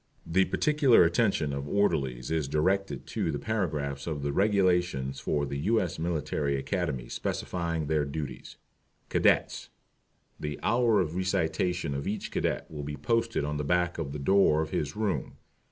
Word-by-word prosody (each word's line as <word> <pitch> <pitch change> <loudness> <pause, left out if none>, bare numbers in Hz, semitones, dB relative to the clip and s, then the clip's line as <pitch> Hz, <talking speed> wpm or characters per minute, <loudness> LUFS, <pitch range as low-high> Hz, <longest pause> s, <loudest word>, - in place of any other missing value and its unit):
The 95 +3 +3
particular 150 - +4
attention 85 - +1
of 70 0 -4
Orderlies 70 -11 0
is 80 -3 0
directed 75 +1 0
to 80 - -2
those 70 - -3
paragraphs 75 -8 -2
of 75 -3 -3
the 70 - 0
Regulations 90 -9 +1
for 70 +1 0
the 70 0 -4
U. 110 +9 +2
S. 90 -6 -3
Military 75 -4 -1
Academy 70 -4 -2
specifying 85 +3 -2
their 75 0 +1
duties. 70 -2 -6 0.5
CADETS. - - +2 0.7
The 75 -1 -4
hours 115 -4 +3
of 80 - -8
Recitation 90 -3 0
of 70 +1 -4
each 105 - -3
Cadet - - -1
will 75 -2 -5
be 75 0 -5
posted 115 +4 0
on 75 0 -2
the 75 - -2
back 85 +3 +1
of 75 -4 -3
the 75 - -4
door 80 0 +4
of 80 - -7
his 75 -1 -2
room. 105 -3 -1
80 Hz, 160 wpm, -28 LUFS, 70-95 Hz, 0.7 s, particular